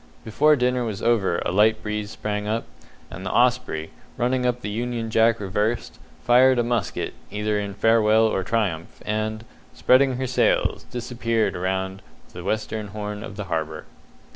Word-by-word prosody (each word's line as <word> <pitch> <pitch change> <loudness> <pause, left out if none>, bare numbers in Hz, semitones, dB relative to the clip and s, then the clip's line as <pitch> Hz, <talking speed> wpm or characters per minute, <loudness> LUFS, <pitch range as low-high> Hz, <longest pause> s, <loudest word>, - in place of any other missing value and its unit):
Before 150 +7 +4
dinner 125 -1 +1
was 110 -4 -4
over 105 -7 +2
a - - 0
light 105 +3 +3
breeze 105 -1 -3
sprang 105 -1 -4
up, 110 +2 -1 0.5
and 95 - -8
the 95 - -3
Osprey, 120 -10 +1 0.3
running 125 +1 +1
up 125 0 -1
the 105 - -4
union 115 0 -3
jack 115 +1 +3
reversed, 105 +4 -2 0.2
fired 130 +1 +5
a 120 - +3
musket, 120 -3 -2 0.2
either 105 0 -1
in 100 -1 -5
farewell 110 +1 +4
or 95 -4 0
triumph, 95 -6 -2
and, 110 +1 -2 0.3
spreading 130 0 +4
her 130 +1 -2
sails, 125 0 +1
disappeared 115 -2 -1
round 95 +1 -2 0.3
the 90 - -8
western 110 +1 -2
horn 105 +1 -6
of 105 - -8
the 105 - -4
harbour. 80 -4 -3
110 Hz, 160 wpm, -24 LUFS, 105-120 Hz, 0.5 s, fired